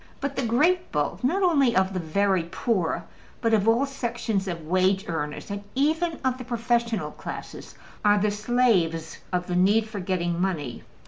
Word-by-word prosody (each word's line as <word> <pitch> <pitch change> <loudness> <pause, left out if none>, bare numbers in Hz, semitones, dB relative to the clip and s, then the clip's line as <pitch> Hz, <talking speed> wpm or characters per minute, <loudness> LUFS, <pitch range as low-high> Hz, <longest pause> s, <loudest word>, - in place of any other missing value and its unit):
But 280 0 -3
the - - 0
great 305 +10 +2
bulk, 150 +6 -1
not 370 +10 +2
only 280 -9 +4
of 190 0 +2
the 185 - -1
very 190 +3 +1
poor, 170 -2 -1 0.4
but, 230 -2 +1
of 210 -1 +3
all 235 +5 +4
sections 235 -7 -2
of 170 -3 -4
wage 185 +3 +2
earners 150 +2 -4
and 200 0 -4
even 320 +4 +1
of 255 0 +1
the - - -5
professional 235 -1 0
classes, - - -8 0.3
are 205 0 +5
the 210 +1 +2
slaves 205 -8 +1
of 180 -1 0
the 180 - -3
need 205 +5 +3
for 215 -2 -6
getting 175 -2 -1
money. 155 -10 -2
205 Hz, 175 wpm, -25 LUFS, 180-245 Hz, 0.4 s, are